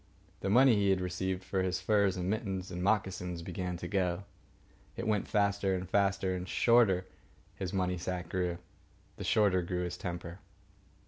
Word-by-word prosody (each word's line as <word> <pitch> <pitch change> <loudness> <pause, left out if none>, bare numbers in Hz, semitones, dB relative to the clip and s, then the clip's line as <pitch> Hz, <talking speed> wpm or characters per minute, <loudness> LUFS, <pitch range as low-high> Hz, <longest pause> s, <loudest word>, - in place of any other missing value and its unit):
The 95 - -2
money 125 +4 +6
he 100 -1 +2
had 95 -1 +3
received 90 +1 -2
for 95 0 -1
his 90 0 0
furs 100 -1 +2
and 90 0 -2
mittens 95 -3 -2
and 90 0 -4
moccasins 95 -4 0
began 90 0 -4
to 90 - -6
go. 90 -1 0 0.7
It - - -4
went 105 -2 0
faster 100 -2 +1
and 90 0 -4
faster, 100 0 +1
and 90 0 -4
the - - -11
shorter 110 -6 +4 0.5
his 95 -3 -4
money 90 -2 0
sack 90 0 -3
grew, 90 -2 -1 0.6
the - - -5
shorter 100 -4 +3
grew 90 0 -2
his 90 0 -4
temper. 85 0 -6
95 Hz, 175 wpm, -32 LUFS, 90-100 Hz, 0.7 s, money